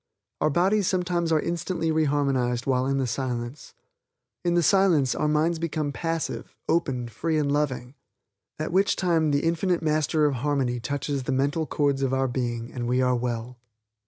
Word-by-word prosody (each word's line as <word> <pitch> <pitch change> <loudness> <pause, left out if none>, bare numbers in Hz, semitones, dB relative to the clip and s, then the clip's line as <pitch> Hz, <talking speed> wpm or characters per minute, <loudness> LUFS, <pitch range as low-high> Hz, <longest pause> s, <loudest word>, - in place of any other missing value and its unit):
Our 155 - +3
bodies 185 +6 +2
sometimes 175 -2 0
are 160 - +4
instantly 170 0 -2
re 160 0 +2
harmonized 130 -4 0
while 130 -1 +1
in 135 0 +1
the 135 - +1
Silence. 125 +2 -4 0.7
In 175 0 +1
the 175 - +3
Silence 170 -8 +4
our 150 - 0
minds 155 +2 +1
become 155 -3 -2
passive, 165 +1 -3
open, 135 -7 0
free 160 +7 -2
and 145 -2 +1
loving, 135 -4 -1 0.6
at 155 - -3
which 195 +3 +3
time 165 -4 +2
the 140 0 +1
Infinite 170 +1 +1
Master 155 0 +2
of 140 -3 +1
harmony 130 -2 0
touches 140 +3 -2
the - - -1
mental 140 +4 0
chords 140 -2 0
of 135 -1 +1
our 135 0 +1
being 120 -2 -3
and 120 -1 -3
we 125 +1 +1
are 125 -1 +3
well. 120 0 -3
145 Hz, 175 wpm, -26 LUFS, 130-165 Hz, 0.7 s, are